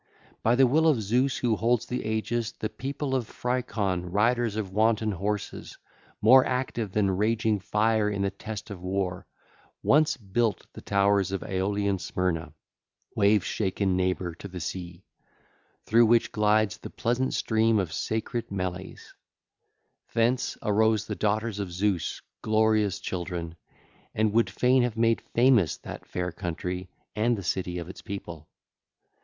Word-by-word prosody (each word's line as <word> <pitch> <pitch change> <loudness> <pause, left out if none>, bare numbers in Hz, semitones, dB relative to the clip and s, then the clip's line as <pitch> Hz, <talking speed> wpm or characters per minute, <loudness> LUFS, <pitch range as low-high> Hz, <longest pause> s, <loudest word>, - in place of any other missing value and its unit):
By 115 +2 +3
the 135 +1 +6
will 155 +6 +3
of 150 -7 +4
Zeus 125 +6 +1
who 120 -3 +1
holds 115 +2 +1
the 125 - -3
aegis 110 +1 -2
the 110 - -4
people 135 +1 -4
of 125 -4 0
Phricon, 105 -8 -2
riders 115 +2 +1
on 100 -4 -4
wanton 110 +1 +2
horses, 100 +2 -4 0.5
more 130 +4 +8
active 125 -5 -2
than 100 -1 +2
raging 110 +1 +1
fire 105 +2 +1
in 100 -1 -2
the 100 - 0
test 105 +1 -7
of 95 -3 -7
war, 90 -1 -2 0.6
once 150 +1 +4
built 110 0 -1
the - - -10
towers 100 -1 +2
of 95 - -3
Aeolian 100 +1 -1
Smyrna, 85 -2 -2 0.6
wave 100 -1 +3
shaken 95 -2 0
neighbour 90 -1 -1
to 90 - -9
the 90 -2 -7
sea, 85 +1 -6 0.8
through 115 +1 +5
which 115 +1 +3
glides 105 -1 +2
the - - -8
pleasant 125 +3 -1
stream 110 0 +2
of 95 -5 -1
sacred 115 +1 -3
Meles; 95 -1 -5 1.0
thence 120 +2 +2
2602 - - -5
arose 110 0 +3
the - - -4
daughters 110 0 -1
of 100 -3 -4
Zeus, 90 -1 -1 0.2
glorious 110 -2 +2
children, 85 -2 -4 0.6
and 110 -1 +1
would 115 +1 +3
fain 125 +1 +3
have 120 -2 -1
made 115 0 +2
famous 120 - +3
that - - -9
fair 90 0 -3
country 90 +2 -4 0.3
and 115 +2 +2
the 100 - -6
city 90 0 -2
of 85 -1 -5
its 90 - -10
people. 85 -7 -8
105 Hz, 150 wpm, -27 LUFS, 95-115 Hz, 1.0 s, more